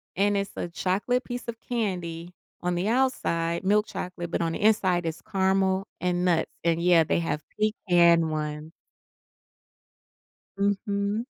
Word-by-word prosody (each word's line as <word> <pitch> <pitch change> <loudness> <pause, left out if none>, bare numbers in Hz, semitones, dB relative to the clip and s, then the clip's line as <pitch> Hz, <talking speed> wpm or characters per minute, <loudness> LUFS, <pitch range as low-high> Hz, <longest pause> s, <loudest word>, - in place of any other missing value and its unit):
and 200 +2 +2
it's 200 0 -2
a - - -4
chocolate 200 +9 0
piece 245 0 -6
of 230 -1 -5
candy 180 -8 -3 0.3
on 180 0 -1
the 175 +3 -1
outside, 205 -10 0
milk 210 +2 +3
chocolate, 175 -2 -6
but - - 0
on 165 -1 0
the - - -4
inside, 190 -5 +3
it's 165 0 -4
caramel 190 -1 +1
and 180 0 0
nuts, 170 -3 +1
and, 170 0 +1
yeah, 175 -2 +5
they - - +1
have 155 -3 -2 0.2
pecan 175 -6 +3
one. 150 0 -4 1.9
Mhm. 200 +2 0
185 Hz, 140 wpm, -26 LUFS, 170-205 Hz, 1.9 s, yeah